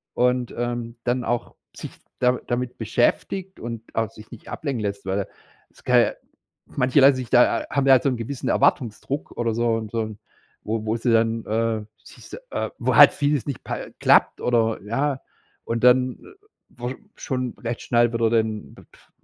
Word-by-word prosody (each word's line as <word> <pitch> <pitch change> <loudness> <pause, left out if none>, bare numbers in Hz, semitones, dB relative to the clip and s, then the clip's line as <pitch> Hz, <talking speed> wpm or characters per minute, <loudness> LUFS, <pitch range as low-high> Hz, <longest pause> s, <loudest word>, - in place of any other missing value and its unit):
und, 125 0 +1
ähm, 120 -1 -3
dann 125 +1 0
auch 120 0 -2 0.2
sich - - -8 0.3
da 125 0 +2
damit 125 0 -2
beschäftigt 180 - -1
und 115 -1 -6
auch 115 -1 0
sich 110 0 -15
nicht 115 - -12
ablenken 135 -7 -3
lässt, 100 -1 -4
weil 95 +1 -1 0.4
es - - -22
kann - - +4
ja - - +1 0.5
manche 130 +2 +1
lassen 135 0 +7
sich 125 -2 -5
da 125 -1 +4
haben 140 0 0
da 135 - +5
halt 130 - +4
so 140 - +3
'nen 125 - -2
gewissen 120 +3 -4
Erwartungsdruck 135 0 0
oder 115 -1 0
so 115 -1 +1
'n 110 -1 -5
so 115 - -1
'n 110 -1 -8 0.4
wo 110 0 -3
wo 110 +1 0
sie 120 +1 0
dann, 115 0 +1
äh, 110 0 -1 0.2
sich - - -15
se - - -9
äh, - - -2
wo - - 0
halt - - +9
vieles 145 -2 0
nicht 140 -4 -5
pa - - -5
klappt - - +4
oder 115 -2 +1
ja, 135 +6 -1 0.4
und 115 0 -3
dann, 125 0 +4
äh, 410 +1 -18 0.2
wo 120 +1 -5 0.2
schon 125 -2 -3
recht 115 0 -4
schnell 120 -1 +2
wieder 115 -1 +2
dann, 110 -2 -1 0.2
pf, - - -23
120 Hz, 185 wpm, -23 LUFS, 115-130 Hz, 0.5 s, halt